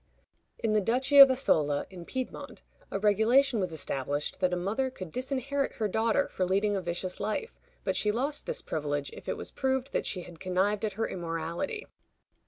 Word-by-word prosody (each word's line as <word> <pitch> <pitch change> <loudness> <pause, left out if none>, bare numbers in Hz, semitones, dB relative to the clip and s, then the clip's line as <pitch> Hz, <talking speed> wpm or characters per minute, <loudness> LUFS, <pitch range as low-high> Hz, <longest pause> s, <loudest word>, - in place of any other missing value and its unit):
In 220 -1 0
the 215 - +4
Duchy 255 +6 +3
of 275 -1 +12
Asola, 155 - +2
in 175 -2 -9
Piedmont, 260 +4 -6 0.3
a - - -2
regulation 220 +5 +4
was 185 -3 -1
established 145 -2 -2
that 185 -1 +2
a - - +1
mother 205 +9 -1
could 185 -10 -8
disinherit 275 - -2
her 215 - -1
daughter 225 +6 +1
for 185 - -2
leading 200 +3 +2
a 195 - -1
vicious 175 +1 -4
life, 215 - -3 0.2
but - - 0
she 210 - +2
lost 275 +7 -2
this - - -2
privilege 145 -2 -2
if - - -9
it - - -1
was - - -6
proved 265 0 -1
that - - 0
she 180 -3 -3
had 170 -2 -12
connived 190 +3 0
at 215 -2 -1
her 225 +3 -1
immorality. 170 - -3
210 Hz, 190 wpm, -29 LUFS, 175-260 Hz, 0.3 s, of